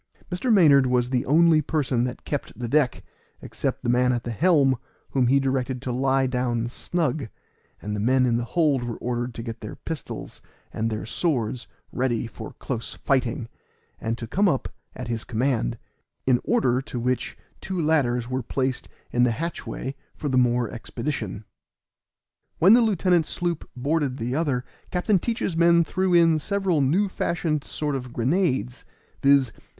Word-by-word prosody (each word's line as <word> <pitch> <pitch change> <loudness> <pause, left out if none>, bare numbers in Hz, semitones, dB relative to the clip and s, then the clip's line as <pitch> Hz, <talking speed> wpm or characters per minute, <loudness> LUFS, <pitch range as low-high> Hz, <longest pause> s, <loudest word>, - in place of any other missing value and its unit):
Mr. 180 +8 0
Maynard 145 -10 +6
was 125 0 +1
the 125 -2 0
only 160 +2 +5
person 135 -5 0
that 125 - -6
kept 145 - -4
the 120 - -3
deck, 140 0 +1 0.4
except - - -4
the - - -1
man 125 +1 +3
at 120 -1 -1
the 120 - -4
helm, 140 - +3 0.3
whom 130 -3 +2
he 135 +3 +4
directed 130 -1 -1
to 130 - -2
lie 135 +2 +2
down 125 -2 -1
snug, 150 0 -2 0.5
and 105 0 -4
the - - -3
men 130 +4 +3
in 120 -2 +2
the 120 - 0
hold 145 0 +1
were 120 -2 -4
ordered 120 0 -3
to 115 - -5
get 115 -1 -6
their 105 - -7
pistols 160 -2 -7 0.3
and 115 +1 -1
their 110 -1 -4
swords 125 -2 -1 0.2
ready 125 -2 0
for 110 -1 -9
close 115 -5 -5
fighting, 125 -4 0 0.5
and 115 +1 -2
to 115 - -6
come 200 - +2
up 135 - -1 0.3
at 125 - -6
his 115 -2 -3
command; 120 - 0 0.5
in 125 -2 +3
order 130 - +2
to 130 -2 -6
which 125 +1 -1 0.2
two 190 -2 -3
ladders 135 -7 +1
were 130 +1 -2
placed 130 +2 -2 0.2
in 120 - +1
the 125 - +5
hatchway 140 0 -4 0.2
for 150 - -3
the 130 - 0
more 125 -1 +3
expedition. 115 -4 -4 1.1
When 190 +6 +7
the 240 - +7
lieutenant's 185 -6 +2
sloop 175 -3 -2
boarded 140 0 0
the 120 +2 -2
other 140 -6 0 0.2
Captain 185 +2 +2
Teach's 225 -4 -2
men 170 0 +5
threw 185 +3 -1
in 165 -2 +5
several 190 -2 0
new 170 +10 +2
fashioned 165 -5 -1
sort 150 -1 -3
of 125 -2 -5
grenades, 130 -1 0 0.4
viz. 140 -3 +4
130 Hz, 165 wpm, -25 LUFS, 120-160 Hz, 1.1 s, When